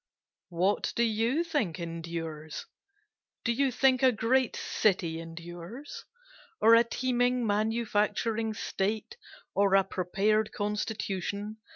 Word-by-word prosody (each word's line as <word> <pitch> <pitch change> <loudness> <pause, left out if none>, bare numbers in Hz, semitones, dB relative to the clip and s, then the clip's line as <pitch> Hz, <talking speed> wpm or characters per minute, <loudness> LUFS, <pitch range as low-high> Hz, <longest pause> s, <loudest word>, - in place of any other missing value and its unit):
What 185 +4 0
do 235 - +3
you 230 +7 +1
think 290 - -1
endures? 165 -2 -5 0.8
Do 235 - +3
you 270 +3 +2
think 255 +1 +3
a 260 -1 +6
great 245 +3 +1
city 180 -6 0
endures? 175 - -9 0.5
Or 225 - +6
a 230 +1 +8
teeming 245 0 0
manufacturing 220 +1 0
state? 215 - -2 0.4
or 200 -1 +3
a 195 - +6
prepared 200 +4 0
constitution? 205 0 -3
215 Hz, 105 wpm, -29 LUFS, 185-235 Hz, 0.8 s, a